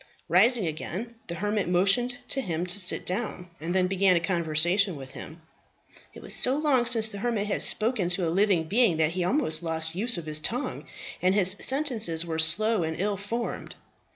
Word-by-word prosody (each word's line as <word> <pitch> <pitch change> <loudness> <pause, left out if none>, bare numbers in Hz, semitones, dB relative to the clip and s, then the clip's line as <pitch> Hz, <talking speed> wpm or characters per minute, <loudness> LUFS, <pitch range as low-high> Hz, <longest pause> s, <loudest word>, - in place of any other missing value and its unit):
Rising 215 +5 +3
again, 180 +8 -6
the 170 - -6
hermit 205 +1 -3
motioned 200 +8 +2
to 270 - 0
him 175 -5 -4
to 180 +3 -2
sit 185 - +1
down, 185 -3 -5
and 170 +4 -5
then 185 -1 +1
began 190 0 +1
a - - +2
conversation 170 +2 0
with 135 -2 -11
him. 160 +4 -12 0.7
It - - -13
was - - -4
so 260 +2 +1
long 275 -6 0
since 225 -2 +3
the 200 - -8
hermit 225 -2 -2
had 205 - -2
spoken 215 -5 +1
to 180 +1 0
any 165 - -1
living 190 -2 +1
being, 200 0 +1
that 160 0 0
he 180 +1 -4
had 175 - -1
almost 180 - +1
lost 160 -1 -2
the 180 - -7
use 235 -1 +2
of 170 - -7
his 155 0 +1
tongue, 245 - -3 0.4
and 185 +1 +1
his 190 -3 +6
sentences 230 - +3
were 160 -1 -5
slow 200 +7 +4
and 160 0 -5
ill 205 +2 -2
formed. 225 +4 -6
190 Hz, 205 wpm, -25 LUFS, 170-220 Hz, 0.7 s, his